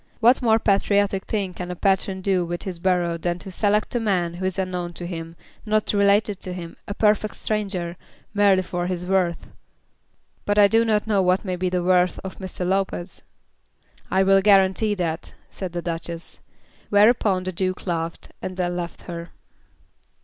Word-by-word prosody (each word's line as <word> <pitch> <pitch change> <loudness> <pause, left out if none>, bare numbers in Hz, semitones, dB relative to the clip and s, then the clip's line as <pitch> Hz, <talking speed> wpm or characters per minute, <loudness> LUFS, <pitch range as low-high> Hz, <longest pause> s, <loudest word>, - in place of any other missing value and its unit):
What 240 +4 +5
more 225 -3 +4
patriotic 200 -2 +1
thing 200 -4 -2
can 180 0 -6
a 180 - -4
patron 190 0 0
do 185 -2 +2
with 175 0 -4
his 180 -3 -5
borough 175 -2 +1
than 175 +1 -1
to 190 +2 -9
select 210 +2 +1
a 240 - +1
man 185 -6 0
who 180 +2 -5
is 190 0 -1
unknown 180 -2 -3
to 175 - -7
him, 165 -1 -6 0.3
not 215 -1 0
related 200 0 +3
to 185 - -5
him, 170 -2 -7
a 200 - -4
perfect 215 0 +2
stranger, 195 -5 -3 0.4
merely 200 -2 +4
for 175 -1 -3
his 180 -1 -3
worth?" 180 -3 0 1.0
"But 205 0 0
I 205 -1 +8
do 225 +2 +3
not 215 -2 +1
know 205 -3 +2
what 185 +2 +2
may 185 -1 -1
be 180 +1 -1
the 180 -1 -1
worth 180 0 +3
of 190 - -7
Mr. 185 -2 -4
Lopez." 190 -2 -2 0.9
"I 190 - +3
will 195 0 +5
guarantee 195 +1 +4
that," 165 -3 -3 0.2
said 185 -3 -5
the 175 0 -4
Duchess. 165 0 -5 0.5
Whereupon 205 -2 +4
the 185 - -3
Duke 185 +1 -2
laughed, 165 -2 -3
and 185 0 -5
then 175 -1 -1
left 175 -1 -5
her. 170 -1 -7
185 Hz, 180 wpm, -23 LUFS, 175-200 Hz, 1.0 s, I